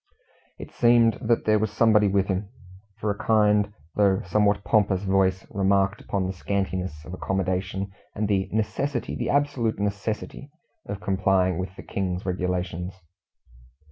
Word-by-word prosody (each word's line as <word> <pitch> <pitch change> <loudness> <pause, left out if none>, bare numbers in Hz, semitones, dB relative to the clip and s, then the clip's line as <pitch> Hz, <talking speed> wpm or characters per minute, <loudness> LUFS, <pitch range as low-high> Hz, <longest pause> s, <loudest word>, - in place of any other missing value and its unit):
It - - -9
seemed 120 -2 +4
that 115 +1 +1
there 110 0 +4
was 110 0 0
somebody 105 -1 +4
with 100 0 +2
him, 95 +1 -2 0.5
for 105 -1 -1
a 100 - -6
kind, 105 -2 +3 0.2
though 100 -2 +3
somewhat 100 +2 +2
pompous, 100 -3 +2
voice 95 -1 +1
remarked 95 0 +1
upon 95 -2 -2
the 95 - -2
scantiness 95 -4 -3
of 90 - -8
accommodation, 95 +1 -2 0.2
and 105 0 -1
the 95 -2 0
"necessity 110 +6 -1
the - - -3
absolute 140 -6 +1
necessity" 105 +7 -3 0.4
of 100 0 -5
complying 95 -2 +1
with 95 +1 -5
the - - -10
King's 90 -2 -3
Regulations. 90 -1 -2
100 Hz, 140 wpm, -25 LUFS, 95-105 Hz, 0.5 s, seemed